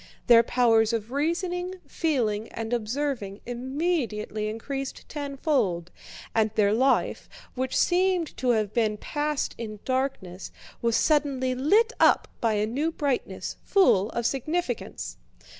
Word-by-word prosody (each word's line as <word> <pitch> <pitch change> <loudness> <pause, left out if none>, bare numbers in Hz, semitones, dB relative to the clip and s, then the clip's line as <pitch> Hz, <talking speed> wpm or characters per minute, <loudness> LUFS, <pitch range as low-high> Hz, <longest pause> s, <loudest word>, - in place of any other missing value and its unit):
Their 235 -1 +8
powers 230 -2 +3
of 225 0 -3
reasoning, 355 +5 -1
feeling, 225 - -1
and 225 +1 -5
observing 235 -3 -2
immediately 245 -5 -2
increased 270 +5 -5
tenfold, 270 - -1 0.4
and 220 -1 +3
their 205 -1 +3
life, 260 +4 +1 0.2
which 260 0 -2
seemed 360 -2 +2
to 255 - 0
have 215 -4 +1
been 220 -3 +1
passed 295 +4 -2
in 215 -2 -5
darkness, 255 -9 -2 0.3
was 230 -1 +2
suddenly 280 -4 +2
lit 410 - +3
up - - +5
by 230 -2 +2
a 210 0 +1
new 280 +9 -1
brightness, 285 -5 -2
full 220 - +4
of 235 0 -3
significance. 310 +8 -2
255 Hz, 125 wpm, -26 LUFS, 220-295 Hz, 0.4 s, Their